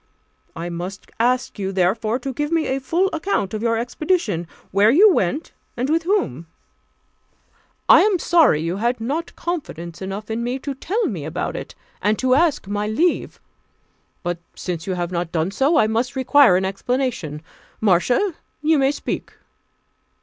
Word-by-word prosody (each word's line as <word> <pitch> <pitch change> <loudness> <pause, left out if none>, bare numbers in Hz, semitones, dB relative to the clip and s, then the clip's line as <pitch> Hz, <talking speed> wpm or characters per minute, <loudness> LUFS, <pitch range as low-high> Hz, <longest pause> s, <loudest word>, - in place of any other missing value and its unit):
I 170 +1 -4
must 180 +3 -7
ask 245 -1 +1
you, 195 -1 -2
therefore, 205 +5 +1
to 265 +1 -5
give 295 +4 -2
me 330 -2 +2
a 265 - -1
full 340 +8 +1
account 320 - -1
of 215 - -3
your 230 -1 +1
expedition 240 - -1 0.2
where 200 +3 +5
you 380 - +7
went, 200 - -1 0.3
and 255 +4 -1
with 325 +1 +3
whom. 170 - 0 1.4
I - - +8
am 405 -1 +3
sorry 330 - +4
you 170 +3 -2
had 240 +3 0
not 290 +9 -3
confidence 175 - -5
enough 195 +3 -5
in 230 +1 -2
me 245 +2 -1
to 275 +1 -5
tell 400 - -1
me 180 - -3
about 160 +3 -3
it, - - -7 0.3
and 210 +1 +2
to 255 -1 +2
ask 300 - +2
my 205 +1 -2
leave; 315 +12 0 0.8
but 175 -1 -2 0.2
since 170 -2 -5
you 185 - -1
have 175 0 -3
not 170 -1 -2
done 165 +2 0
so, 275 - +2
I 255 - +5
must 230 +4 -1
require 260 -6 +5
an 190 - 0
explanation, 195 - -2 0.4
Marcia, 220 - +2 0.3
you 310 -1 +4
may 270 0 +3
speak." 290 - -4
235 Hz, 165 wpm, -21 LUFS, 185-295 Hz, 1.4 s, I